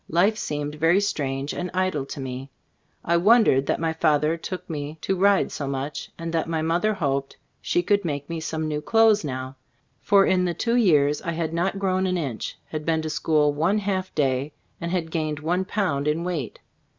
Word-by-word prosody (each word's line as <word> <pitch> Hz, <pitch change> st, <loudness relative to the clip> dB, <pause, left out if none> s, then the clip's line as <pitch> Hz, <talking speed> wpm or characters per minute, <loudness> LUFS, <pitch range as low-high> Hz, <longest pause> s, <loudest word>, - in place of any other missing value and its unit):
Life 185 Hz, +7 st, +3 dB
seemed 150 Hz, -7 st, -3 dB
very 165 Hz, +5 st, +3 dB
strange 140 Hz, -8 st, -2 dB
and 180 Hz, 0 st, -3 dB
idle 185 Hz, -7 st, 0 dB
to -, -, -7 dB
me. 130 Hz, 0 st, -5 dB
■ -, -, -44 dB
I 170 Hz, 0 st, +3 dB
wondered 195 Hz, -, +4 dB
that -, -, 0 dB
my 165 Hz, 0 st, 0 dB
father 155 Hz, 0 st, +2 dB
took 180 Hz, +2 st, -6 dB
me 150 Hz, -1 st, -5 dB
to 195 Hz, -, 0 dB
ride 200 Hz, +1 st, +3 dB
so 140 Hz, -, -4 dB
much, 140 Hz, +2 st, -4 dB
and 165 Hz, 0 st, -5 dB
that 165 Hz, 0 st, 0 dB
my 160 Hz, -1 st, -1 dB
mother 175 Hz, +7 st, +1 dB
hoped 140 Hz, -6 st, -2 dB, 0.2 s
she 175 Hz, -, +1 dB
could 205 Hz, +2 st, +2 dB
make 145 Hz, -4 st, -3 dB
me 165 Hz, -1 st, -4 dB
some 160 Hz, 0 st, -3 dB
new 150 Hz, -1 st, -2 dB
clothes 220 Hz, +3 st, +4 dB
now, 130 Hz, -2 st, -5 dB, 0.4 s
for 200 Hz, -1 st, +5 dB
in 180 Hz, -1 st, +2 dB
the 175 Hz, -1 st, -1 dB
two 235 Hz, 0 st, 0 dB
years 150 Hz, -10 st, +3 dB
I 170 Hz, -, -3 dB
had 160 Hz, -1 st, -2 dB
not 180 Hz, +4 st, 0 dB
grown 190 Hz, -1 st, 0 dB
an 185 Hz, 0 st, 0 dB
inch, 135 Hz, -9 st, -4 dB
had 155 Hz, -1 st, -4 dB
been 160 Hz, 0 st, 0 dB
to 155 Hz, -, -3 dB
school 150 Hz, 0 st, +2 dB
one 165 Hz, +8 st, +1 dB
half 190 Hz, -2 st, -2 dB
day, 140 Hz, 0 st, 0 dB, 0.3 s
and 170 Hz, -, -2 dB
had 170 Hz, -2 st, -2 dB
gained 155 Hz, -2 st, -2 dB
one 175 Hz, +4 st, 0 dB
pound 170 Hz, -9 st, -1 dB
in 155 Hz, +3 st, 0 dB
weight. 165 Hz, -10 st, -3 dB
160 Hz, 205 wpm, -24 LUFS, 145-185 Hz, 0.4 s, for